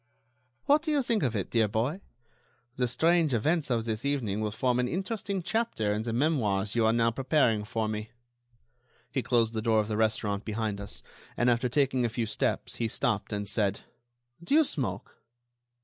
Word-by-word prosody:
"What 290 +2 +4
do 320 - -4
you 290 -3 +2
think 230 -3 +1
of 120 -4 0
it, 100 - -3
dear 115 -2 +3
boy? 120 - -1 0.7
The 125 -1 +1
strange 160 +2 +3
events 150 +6 +1
of 115 -3 0
this 110 0 -2
evening 120 -8 -1
will 105 - 0
form 125 +3 0
an 125 - +1
interesting 195 - -3
chapter 220 - 0
in 105 - -1
the 115 +1 -3
memoirs 110 -7 +1
you 115 -2 +3
are - - +4
now 115 0 +2
preparing 130 -4 +2
for 110 +1 -2
me." 105 0 -4 1.0
He - - 0
closed 115 -2 +1
the 110 - -2
door 110 0 +3
of 105 - 0
the 105 -1 -2
restaurant 105 -2 0
behind 110 -2 -3
us, 100 - -7 0.3
and, 120 0 +3
after 120 +1 +1
taking 130 -1 +1
a 120 - +1
few 115 +1 -2
steps, 110 - -2
he 115 - 0
stopped 110 -3 -1
and 105 -1 -3
said: 100 -1 0 0.6
"Do 225 - +1
you 320 - +7
smoke?" 115 - -4
115 Hz, 190 wpm, -29 LUFS, 110-140 Hz, 1.0 s, you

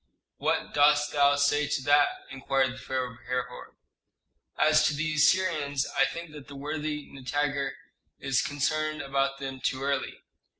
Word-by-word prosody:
"What - - -1
dost 145 0 +4
thou 145 0 +4
say 145 +1 +2
to 135 - -2
that?" 145 +1 +5 0.2
inquired 135 -1 0
the - - -11
pharaoh 130 -2 -3
of 120 - -18
Herhor. 125 0 -4 0.8
"As 155 0 +4
to 155 - -1
the 155 +2 -1
Assyrians, 155 -3 +2
I - - +4
think 170 -1 -6
that 150 -2 -11
the 145 - -10
worthy 150 +1 -4
Nitager 140 0 -2 0.4
is 135 -2 0
concerned 155 +2 -1
about 135 0 0
them 135 -1 -6
too 130 +1 -1
early. 140 -1 -2
145 Hz, 155 wpm, -28 LUFS, 135-150 Hz, 0.8 s, that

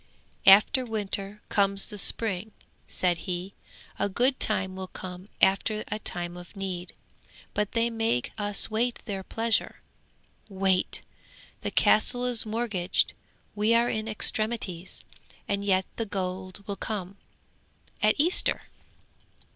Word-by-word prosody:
'"After 210 +7 +7
winter 210 -2 -3
comes 200 -1 +2
the 210 - -9
spring," 210 0 0 0.3
said 180 -2 +1
he; 180 +2 -3 0.5
"a - - +1
good 255 +6 +2
time 190 -3 +1
will 190 0 -5
come 185 +1 -9
after 210 +3 +3
a 210 0 -2
time 175 -3 -3
of 175 +3 -12
need; 185 -2 -5 0.6
but 210 0 -1
they 235 0 +2
make 225 - 0
us 205 0 +1
wait 235 +2 0
their 200 -4 -4
pleasure, 225 +4 -1 0.7
wait! 190 -1 +1 0.6
The - - -2
castle 245 +3 +3
is 240 -3 +3
mortgaged, 215 -5 0 0.4
we 215 +2 +3
are 235 +1 +3
in 215 0 -2
extremities 215 -4 0 0.5
and 200 0 -1
yet 190 -2 +2
the 225 - -2
gold 185 +1 -5
will 200 -1 -4
come 195 -2 -4 0.8
at 215 0 +4
Easter!" 335 +5 +5
200 Hz, 125 wpm, -27 LUFS, 190-220 Hz, 0.8 s, After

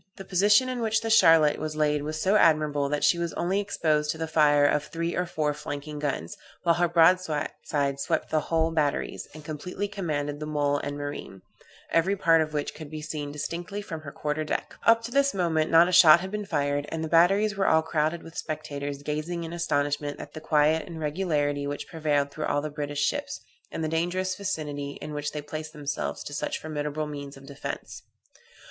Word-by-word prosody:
The 195 - -8
position 205 +7 +4
in 255 -1 -3
which 220 -1 +1
the 225 - -3
Queen 220 - +7
Charlotte 155 -2 +5
was 155 0 -4
laid 150 -1 +1
was 155 +2 -4
so 190 +6 +2
admirable 150 -6 +3
that 150 0 -1
she 170 - +4
was 170 -1 -2
only 185 +3 0
exposed 155 -7 0
to 160 - -1
the 160 0 -3
fire 145 -2 +4
of 145 0 +2
three 170 +1 -3
or 180 - -1
four 150 -3 -1
flanking 150 0 -6
guns, 140 - -3 0.3
while 170 -2 +4
her 175 +1 +2
broadside 155 -4 +1
swept - - -1
the 155 - +3
whole 160 +1 0
batteries, 150 -3 -1
and 155 -1 -11
completely 180 +6 -4
commanded 150 -7 -3
the 150 - -5
mole 145 -1 +1
and 145 0 -4
marine, 145 -9 -6 0.5
every 175 +4 +2
part 165 -4 +4
of 155 -1 -2
which 150 -1 -2
could 155 -1 -9
be 155 0 -7
seen 150 -2 -4
distinctly 170 +6 -5
from 165 -6 -6
her 145 -2 -8
quarter 150 +2 -2
deck. 155 - -3
Up 230 0 +6
to 235 - -6
this 280 -2 +2
moment 165 -4 +1
not 165 +1 +6
a - - -1
shot 170 -2 +8
had 190 +2 -6
been 210 0 -3
fired, 145 -4 0
and 160 0 -3
the - - -2
batteries 195 +6 +4
were 195 0 +1
all 160 0 +4
crowded 160 +1 -1
with 165 0 -12
spectators, 145 -2 -5
gazing 155 +4 -3
in 165 +1 -6
astonishment 145 -3 -1
at - - -9
the 155 - -8
quiet 155 +1 +2
and 165 -2 -7
regularity 150 -3 -1
which 145 0 -5
prevailed 150 -4 0
through 155 +1 -4
all 145 - +1
the 155 - -4
British 145 -1 -3
ships, - - -2 0.3
and 160 - -4
the - - 0
dangerous 175 +4 -1
vicinity 145 -7 -4
in 150 - -7
which 150 0 -3
they 150 -1 -5
placed 155 +1 -6
themselves 145 -1 -4
to 145 - -8
such 145 - -2
formidable 150 0 -3
means 140 -2 -7
of 135 - -14
defence. 140 0 -7
155 Hz, 210 wpm, -27 LUFS, 145-170 Hz, 0.5 s, shot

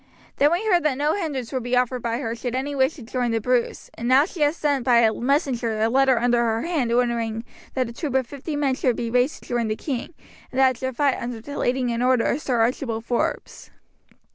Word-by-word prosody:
Then 290 +2 +4
we 355 +6 0
heard 360 -5 +3
that 300 -5 0
no 295 +2 +1
hindrance 285 - -3
would 260 - -1
be 245 +1 0
offered 250 0 0
by 230 0 -1
her 230 -3 -3
should 245 +1 -4
any 275 +3 -2
wish 265 +2 +1
to 275 - -10
join 245 +1 -2
the 230 0 +1
Bruce; 245 +2 -1
and 235 - -5
now 265 +3 +5
she 345 - -10
has 295 +3 +2
sent 285 -4 0
by 245 -2 +4
a 225 -2 +4
messenger 245 -4 0
a 220 +1 +2
letter 265 0 +3
under 240 +1 +2
her 225 -1 0
hand 310 -9 -1
ordering 235 -2 0 0.3
that 255 -2 0
a 235 - -8
troop 270 +1 -4
of 265 -1 +2
fifty 285 +4 -6
men 285 -2 +1
shall 255 -1 +1
be 230 0 -4
raised 250 +4 +1
to - - -16
join 240 -2 0
the 215 - -1
king, 265 +5 -5 0.4
and 260 - -2
that 265 -1 +6
it 255 - -8
shall 260 0 -3
fight 275 +1 +1
under 235 -1 -4
the 285 +6 -8
leading 250 0 0
and 235 0 -2
order 250 -2 +3
of 285 - 0
Sir 245 -5 0
Archibald 230 -1 -1
Forbes." 240 0 -2
250 Hz, 245 wpm, -23 LUFS, 235-275 Hz, 0.4 s, that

